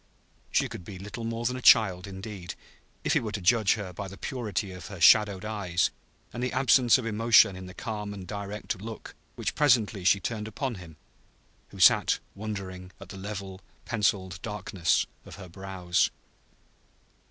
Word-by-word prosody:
She - - +2
could - - -9
be 95 +2 -9
little 105 +5 -7
more 115 +1 -3
than 125 +2 0
a 130 - -6
child, 95 -6 +5
indeed, 95 -2 -7 0.5
if - - +1
he - - +4
were 110 -2 -5
to 100 - -2
judge 105 +2 +3
her 100 -4 -6
by 100 +3 -6
the 95 +1 -10
purity 105 -7 -3
of 90 -3 -9
her 95 -3 -9
shadowed 100 +3 +5
eyes 95 -6 0 0.4
and 120 - -5
the 125 0 -1
absence 130 -2 +5
of 130 - -5
emotion 110 -3 +5
in 95 0 -8
the 90 - -11
calm 105 -3 -5
and 100 -2 -8
direct 100 0 -5
look 110 0 -8 0.2
which - - -2
presently 115 -9 +2
she 100 +2 +4
turned 105 +2 -4
upon 130 +4 -3
him 80 -3 -13 0.7
who - - -12
sat - - +5 0.2
wondering 95 -3 -6
at - - -12
the - - -8
level, 95 -1 -7 0.2
penciled 95 -5 -1
darkness 95 -5 0 0.2
of - - -11
her 95 -2 -10
brows. 90 -1 -1
100 Hz, 175 wpm, -28 LUFS, 95-110 Hz, 0.7 s, child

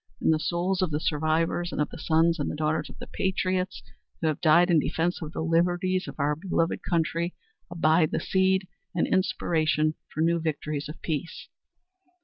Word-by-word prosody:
In - - +3
the 155 - +2
souls 175 +4 0
of 185 - +1
the 150 -1 -1
survivors 160 +3 0
and - - -4
of 150 - 0
the - - -9
sons 165 +1 +2
and 145 +1 -2
daughters 155 +1 -1
of - - -12
the - - -8
patriots 185 0 -1 0.4
who - - -3
have 155 - -3
died 175 +2 +5
in 165 - +5
defence 170 +4 -1
of 155 -2 -5
the - - -4
liberties 175 +3 +1
of - - -7
our 145 +1 +1
beloved 165 0 -1
country 170 0 -1 0.3
abide 160 -2 +3
the - - -1
seed 190 0 +1 0.3
and 170 - +2
inspiration 155 -4 +1 0.2
for 155 - -3
new 170 +1 +3
victories 150 -2 -3
of 155 - -8
peace. 165 +1 -4
165 Hz, 180 wpm, -27 LUFS, 155-175 Hz, 0.4 s, died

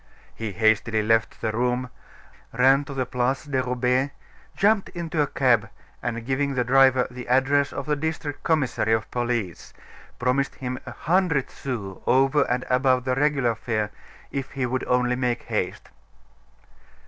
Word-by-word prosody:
He 110 -3 -5
hastily 110 0 +2
left 115 +1 +1
the 110 - 0
room, 125 +2 -1 0.6
ran 135 +4 +4
to 140 - -7
the 130 -1 0
Place 125 +2 -1
de 135 -3 0
Roubaix, 125 +2 +1 0.5
jumped 205 0 +3
into 170 -3 -2
a 145 - +2
cab, 120 -5 +2 0.3
and 115 -1 -3
giving 135 +1 0
the 125 - +2
driver 130 0 +4
the 125 0 -8
address 135 +3 +3
of 140 - -5
the 150 0 +1
district 150 -1 -4
commissary 135 -8 +1
of 110 -1 -1
police, 120 -7 -3 0.4
promised 130 +2 0
him 130 -1 -4
a - - -5
hundred 160 0 +1
sous 105 -8 -6
over 135 +3 +3
and 125 +1 0
above 130 0 +2
the 130 - +1
regular 135 -3 +2
fare 110 -2 -2 0.4
if 135 -1 -4
he 135 -3 -1
would 125 +1 -2
only 125 0 +2
make 125 -2 -1
haste. 105 -5 -3
125 Hz, 155 wpm, -24 LUFS, 120-140 Hz, 0.6 s, ran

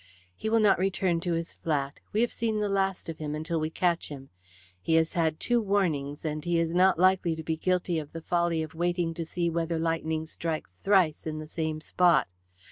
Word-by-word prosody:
"He 220 - -3
will 225 +1 +4
not 205 -5 +4
return 185 -2 +1
to 170 0 -1
his 165 0 -3
flat. 140 -3 -2
We 215 - +1
have 240 - +2
seen 220 -2 -1
the 210 -1 0
last 195 -2 0
of 165 -1 -6
him 150 -1 -3
until 160 +2 -2
we 155 0 -1
catch 170 +1 0
him. 135 -2 -9 0.5
He 160 - +1
has 160 0 +2
had 160 -2 0
two 240 -1 +2
warnings, 165 -9 0
and 155 -1 -2
he 175 0 +1
is 165 0 0
not 185 0 +4
likely 185 -2 +3
to 160 - -7
be 160 0 -1
guilty 180 0 0
of 150 -1 -8
the 165 - -7
folly 170 -2 +1
of 155 - -8
waiting 175 0 0
to 165 0 -4
see 170 +1 -1
whether 165 0 -1
lightning 160 -1 -1
strikes 155 - -4
thrice 185 - +2
in 155 0 -3
the 155 0 -6
same 155 -1 -3
spot. 175 +1 +3
165 Hz, 215 wpm, -28 LUFS, 160-180 Hz, 0.5 s, will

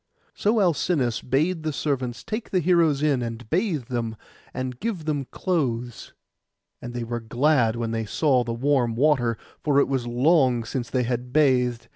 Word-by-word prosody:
So 215 +2 +1
Alcinous 165 - +1
bade 155 +7 0
the 155 0 -2
servants 130 -4 -2
take 220 0 -5
the 185 - +1
heroes 165 -4 +3
in, 140 -4 +2
and 115 -1 -5
bathe 175 - 0
them, 115 -2 -3 0.4
and 130 -1 -5
give 200 -8 -3
them 145 -3 -1
clothes. 125 - -2 0.7
And 120 0 -7
they 120 - -2
were 120 +1 -3
glad 120 0 +2
when 115 -1 -3
they 115 -1 -2
saw 130 +2 +2
the 115 - -4
warm 120 -1 +1
water, 125 -4 +2 0.3
for 145 -2 +2
it - - +3
was 130 -3 -1
long 125 -1 +3
since 120 +1 -4
they 130 -1 0
had 125 +1 -3
bathed. 125 -5 +2
130 Hz, 170 wpm, -24 LUFS, 120-155 Hz, 0.7 s, heroes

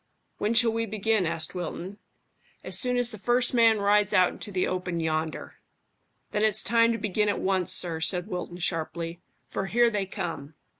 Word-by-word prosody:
"When 215 +3 0
shall 230 -1 +4
we 230 0 -2
begin?" 215 -2 0
asked 165 -1 0
Wilton. 180 +2 -6 0.6
"As - - 0
soon 250 -1 +2
as 245 -1 +1
the 215 - -8
first 245 +4 +2
man 230 -2 +5
rides 205 0 +2
out 185 -2 +5
into 205 - -8
the 185 -1 0
open 180 -2 -3
yonder." 160 0 -3 0.7
"Then 210 - 0
it's 215 -1 +3
time 230 0 +3
to - - -2
begin 210 0 0
at - - 0
once, 190 -1 0
sir," 175 -3 +1
said 180 +2 +1
Wilton 180 -1 -6
sharply, 170 0 -4 0.3
"for 195 - -4
here 235 +3 +3
they 200 -3 -2
come." 150 -5 -6
195 Hz, 185 wpm, -26 LUFS, 175-225 Hz, 0.7 s, man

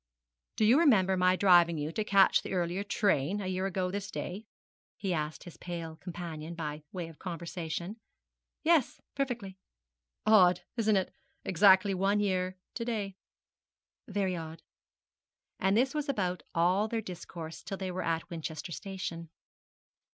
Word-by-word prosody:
'Do 215 - +2
you 245 +7 +6
remember 200 - +4
my 185 0 +4
driving 175 -3 +5
you 150 +1 -2
to 215 - -1
catch 200 -2 +5
the - - -6
earlier 180 +2 -1
train, 200 -3 +1
a 200 - -4
year 185 +1 -1
ago 185 -1 -1
this 200 +1 -4
day?' 205 +5 -5 0.5
he 195 -3 -1
asked 155 -1 -3
his 175 - -11
pale 170 -2 -6
companion, 170 -2 -6
by 150 -2 -4
way 180 -3 -4
of 165 -2 -14
conversation. 170 +2 -5 0.7
'Yes, 320 -5 +3
perfectly.' 240 -9 -3 0.7
'Odd, 185 -5 +6
isn't 220 -3 +3
it? 190 - -1 0.3
exactly 190 +1 +5
one 195 +2 +2
year 185 -2 0 0.2
to 235 - -3
day.' 210 -5 -3 0.9
'Very 195 -3 -1
odd.' 160 -1 -7 1.0
And 195 +2 +2
this 260 +3 +2
was 300 -2 -2
about 185 -8 -1
all 180 +5 +3
their 225 +1 -1
discourse 165 -4 -8
till 195 - -5
they 190 -1 -3
were 185 +1 -3
at 165 0 -1
Winchester 160 0 -5
Station. 170 -3 -5
185 Hz, 150 wpm, -31 LUFS, 170-205 Hz, 1.0 s, you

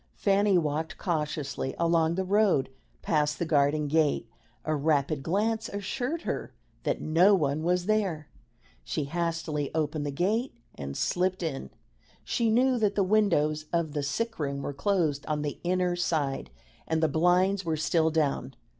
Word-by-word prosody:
Fanny 200 -1 +3
walked 155 -1 -1
cautiously 150 -5 -2
along 165 -1 +2
the 190 - 0
road 195 -8 +2 0.3
past 150 -1 +1
the 170 - -1
garden 150 -1 +2
gate; 150 -5 +1 0.4
a 155 - 0
rapid 145 -1 +1
glance 215 +8 0
assured 245 - -3
her - - -4 0.3
that - - -1
no 180 +6 +5
one 150 -3 0
was 180 +2 +1
there; 190 -8 0 0.6
she 155 - -2
hastily 165 -1 -2
opened 155 -1 -1
the 145 - -2
gate 205 - -1 0.2
and 70 -1 -6
slipped 185 0 0
in. 135 - -4 0.5
She 230 -2 0
knew 250 +2 +3
that 210 -2 +1
the 200 - +3
windows 170 -7 +2
of 170 -3 0
the 145 0 -2
sick 225 +11 -2
room 140 -2 -2
were 145 - -3
closed 150 -2 0
on 150 -1 -1
the 145 -2 -4
inner 180 0 +1
side, 155 - -1 0.4
and 160 0 0
the - - +5
blinds 180 +6 +2
were 160 -2 -1
still 160 +2 +2
down. 150 -4 -1
160 Hz, 155 wpm, -28 LUFS, 150-190 Hz, 0.6 s, no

